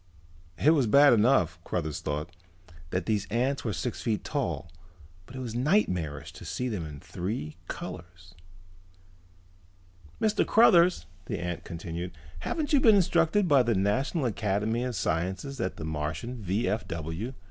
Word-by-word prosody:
It 150 - +5
was 140 -7 +3
bad 140 +4 +7
enough, 105 -7 +3
Cruthers 80 -4 -3
thought, 75 +4 -4 0.5
that 90 +1 -2
these 105 -3 0
ants 125 +6 0
were 110 - -1
six 115 +4 -3
feet 110 -3 -1
tall, 85 - -3 0.6
but 130 - -12
it - - -5
was 120 -3 -5
nightmarish 105 - 0
to - - -11
see 125 - -3
them 100 -9 -3
in 75 -2 -9
three 85 -4 -4
colors. 85 +1 -8 1.9
"Mr. 215 -1 +2
Cruthers," 180 -6 +5 0.2
the - - -2
ant 90 -1 -4
continued, 85 +1 -6 0.3
"haven't 305 - -2
you 285 - +6
been 225 -5 +6
instructed 180 +1 +3
by 140 -4 +6
the 120 -2 +1
National 130 - +1
Academy 110 +1 0
of 125 -2 -3
Sciences 95 - -2
that - - -2
the 80 - -5
Martian 80 +11 -4
V.F.W. 95 - -2
110 Hz, 145 wpm, -28 LUFS, 85-135 Hz, 1.9 s, bad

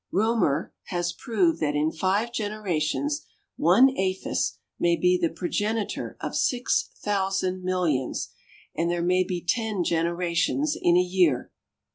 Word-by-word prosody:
REAUMER 195 -7 +1
has 175 -1 -2
proved 190 -8 +1
that 150 -2 0
in 150 +2 +1
five 195 +8 0
generations 215 - -2 0.3
one 260 - +6
aphis 190 0 -1 0.2
may 170 0 +3
be 180 +2 +3
the 170 -2 +1
progenitor 205 +6 -2
of - - -4
six 250 -1 +1
thousand 190 -2 0
millions, 175 -8 -1 0.5
and 170 +1 0
there 175 0 0
may 180 +1 +3
be 180 -1 -4
ten 220 -5 0
generations 170 - 0
in 175 - +3
a - - +6
year! 180 -7 +2
180 Hz, 130 wpm, -26 LUFS, 170-210 Hz, 0.5 s, one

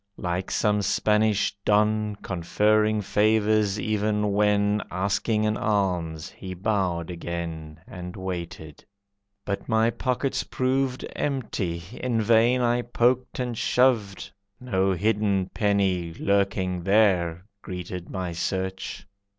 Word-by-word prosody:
Like 90 0 -3
some 105 -1 +1
Spanish 105 0 +2
don, 105 0 +2
Conferring 105 +4 +1
favours 105 0 +2
even 105 -1 0
when 105 0 +2
Asking 100 +4 0
an 105 0 +1
alms, 90 -8 -1
he 95 -1 -8
bowed 90 -4 -1
again 85 -2 -6
And 90 0 -8
waited. 85 -5 -6 0.6
But 100 +3 -4
my 110 +1 +3
pockets 130 +3 -1
proved 130 0 -1
Empty, 105 -11 -2
in 125 -2 -1
vain 115 +3 +4
I 120 0 +2
poked 125 +1 +1
and 125 -2 -2
shoved, 110 -6 +1 0.3
No 95 -6 0
hidden 100 -1 0
penny 95 -5 +1
lurking 95 -2 0
there 90 -3 +2 0.2
Greeted 90 -1 -6
my 95 -2 -3
search. 95 +3 -3
100 Hz, 110 wpm, -25 LUFS, 90-110 Hz, 0.6 s, vain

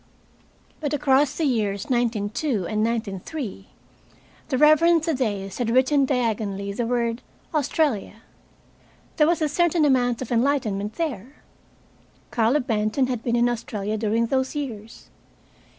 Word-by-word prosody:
But 295 -1 -1
across 285 0 +2
the 325 - 0
years 210 -7 0
1902 235 - -1
and 215 +4 -1
1903, 220 - -4 0.8
the 260 - 0
Reverend 315 +3 +5
Thaddeus 215 - -2
had 240 -2 0
written 265 +3 +3
diagonally 215 -6 -1
the 230 +3 -2
word 235 0 -1 0.3
"Australia." 280 - -1 0.9
There 300 - +5
was 335 -1 +1
a - - +2
certain 330 +1 +2
amount 245 -4 +2
of 250 - -10
enlightenment 230 -5 0
there. 275 - -5 0.9
Carlo 235 +5 +2
Benton 225 +1 0
had 250 -3 -3
been 235 -1 0
in 240 0 +3
Australia 215 -3 -3
during 220 +2 0
those 260 +4 -1
years. 230 -7 -7
240 Hz, 125 wpm, -24 LUFS, 215-285 Hz, 0.9 s, Reverend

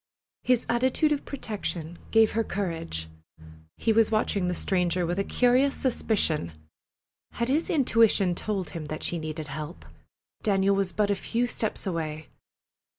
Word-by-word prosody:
His 250 -2 +2
attitude 260 +6 +2
of 290 -1 -1
protection 180 - -4
gave 225 -1 +5
her 225 +1 +1
courage. 165 - -3 0.7
He 225 - +2
was 225 0 +4
watching 210 -4 +1
the 180 - -1
stranger 180 -2 0
with 175 +3 -1
a - - +2
curious 255 +5 +3
suspicion. 200 - 0 0.8
Had 235 +1 -2
his 305 +5 +1
intuition 225 - +4
told 195 0 -3
him 165 -2 -6
that 155 +1 -5
she 170 - 0
needed 155 -1 -5
help? 155 +4 -7 0.6
Daniel 195 -1 +2
was 195 -2 0
but 205 -1 +1
a - - +2
few 235 +5 -1
steps 225 -3 -3
away. 155 -4 -3
200 Hz, 150 wpm, -27 LUFS, 170-230 Hz, 0.8 s, gave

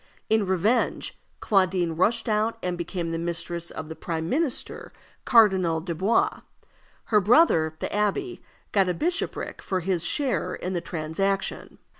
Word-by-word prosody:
In 220 -3 +3
revenge, 205 +6 0 0.2
Claudine 185 -4 +2
rushed 220 +9 +1
out 215 +1 +1
and 180 -1 -1
became 170 -1 -4
the 165 - -2
mistress 170 0 -3
of 155 - -7
the 160 - -7
prime 160 -1 -4
minister, 285 - -2 0.3
Cardinal 190 -8 +4
Dubois. 195 - 0 0.6
Her 210 -2 +3
brother, 185 - +4
the - - -3
abbé, 210 - -1 0.3
got 195 -3 +3
a 180 - 0
bishopric 345 - -2
for 185 -1 -2
his 175 -1 -1
share 280 -4 -1
in 185 - -4
the 175 - -1
transaction. 175 +4 -2
190 Hz, 140 wpm, -25 LUFS, 170-220 Hz, 0.6 s, Cardinal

